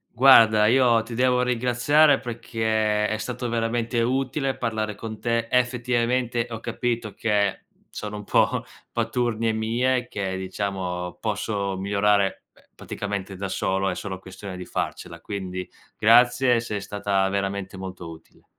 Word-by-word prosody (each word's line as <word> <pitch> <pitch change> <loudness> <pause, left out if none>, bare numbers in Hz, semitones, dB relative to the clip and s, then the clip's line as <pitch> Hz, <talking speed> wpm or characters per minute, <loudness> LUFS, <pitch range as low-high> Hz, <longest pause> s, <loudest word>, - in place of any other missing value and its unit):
Guarda, 115 -4 +7
io 120 -1 +4
ti 115 +1 -8
devo 125 +1 +3
ringraziare, 125 +4 +3
perché 110 -3 -1
è 110 - -1
stato 120 +1 -4
veramente 115 +1 0
utile 135 +2 -1
parlare 110 -2 -2
con 110 +1 -7
te. 115 0 0
Effettivamente, 125 -1 +1
ho 115 - -4
capito 120 -2 -3
che 100 -3 0 0.3
sono 105 0 -6
un 105 - -7
po' - - +2 0.3
paturnie 115 -2 0
mie 120 +3 0
che, 95 -2 -3
diciamo, 95 -2 -4
posso 100 -2 -2
migliorare, 100 0 +1
ehm, - - -24
praticamente 100 -1 -5
da 95 +1 -4
solo, 95 +1 0
è - - -2
solo 95 -2 -5
questione 95 +1 -9
di 90 0 -7
farcela. - - -4
Quindi 95 -2 -5 0.3
grazie, 120 +2 +5
sei 110 -3 -4
stata 100 -1 0
veramente 100 0 -3
molto 95 -2 -7
utile. 80 - -16
110 Hz, 135 wpm, -24 LUFS, 100-120 Hz, 0.3 s, Guarda